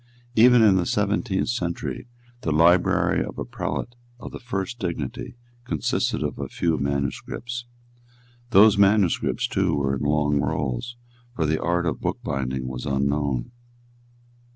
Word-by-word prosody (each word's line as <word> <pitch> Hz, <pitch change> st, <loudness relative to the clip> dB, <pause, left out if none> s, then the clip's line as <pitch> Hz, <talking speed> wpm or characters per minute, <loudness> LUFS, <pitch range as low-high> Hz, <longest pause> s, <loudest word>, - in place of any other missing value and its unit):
Even 120 Hz, +1 st, +7 dB
in 100 Hz, -3 st, +5 dB
the 90 Hz, -, +1 dB
seventeenth 105 Hz, 0 st, 0 dB
century 100 Hz, -2 st, -3 dB, 0.3 s
the 80 Hz, -, -1 dB
library 85 Hz, +4 st, +3 dB
of -, -, -8 dB
a -, -, -4 dB
prelate 120 Hz, -, -4 dB, 0.3 s
of -, -, -8 dB
the -, -, -8 dB
first 120 Hz, -1 st, -4 dB
dignity 85 Hz, -, -4 dB, 0.3 s
consisted 80 Hz, -, -1 dB
of -, -, -4 dB
a -, -, -3 dB
few 80 Hz, -2 st, 0 dB
manuscripts. 70 Hz, -, -3 dB, 0.8 s
Those 105 Hz, -1 st, +6 dB
manuscripts 100 Hz, -3 st, +2 dB
too 95 Hz, -4 st, 0 dB
were 70 Hz, -1 st, 0 dB
in 65 Hz, -, -5 dB
long 75 Hz, 0 st, +1 dB
rolls; 70 Hz, -, -2 dB, 0.4 s
for 80 Hz, -, 0 dB
the 80 Hz, +1 st, 0 dB
art 85 Hz, +1 st, 0 dB
of 80 Hz, -6 st, -2 dB
bookbinding 65 Hz, 0 st, -3 dB
was 65 Hz, +2 st, -5 dB
unknown. 70 Hz, -2 st, -1 dB
85 Hz, 135 wpm, -24 LUFS, 70-105 Hz, 0.8 s, Even